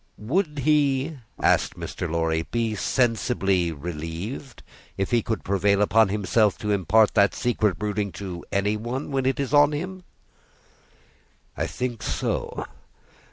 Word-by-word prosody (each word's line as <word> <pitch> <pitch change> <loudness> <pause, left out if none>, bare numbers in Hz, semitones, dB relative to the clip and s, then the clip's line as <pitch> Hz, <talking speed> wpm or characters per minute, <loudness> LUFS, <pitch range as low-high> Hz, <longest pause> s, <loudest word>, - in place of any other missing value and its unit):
"Would 150 - -1
he," 145 0 +2 0.2
asked - - +2
Mr. 90 - -5
Lorry, 80 0 0
"be 115 -2 0
sensibly 105 -6 +1
relieved 85 - -6 0.3
if 95 - -1
he 120 -1 +3
could 110 -2 -3
prevail 100 +1 +2
upon 110 +1 +4
himself 105 +1 +2
to 105 - -2
impart 105 +2 +3
that 100 0 +4
secret 110 -6 +1
brooding 105 -1 -2
to 90 -2 -6
any 105 +2 +1
one, 125 +6 -4
when 135 -1 0
it 135 - 0
is 140 0 -2
on 145 0 +6
him?" 185 +5 -5 1.5
"I - - -1
think 125 -2 -4
so. - - -2
110 Hz, 135 wpm, -25 LUFS, 95-130 Hz, 1.5 s, on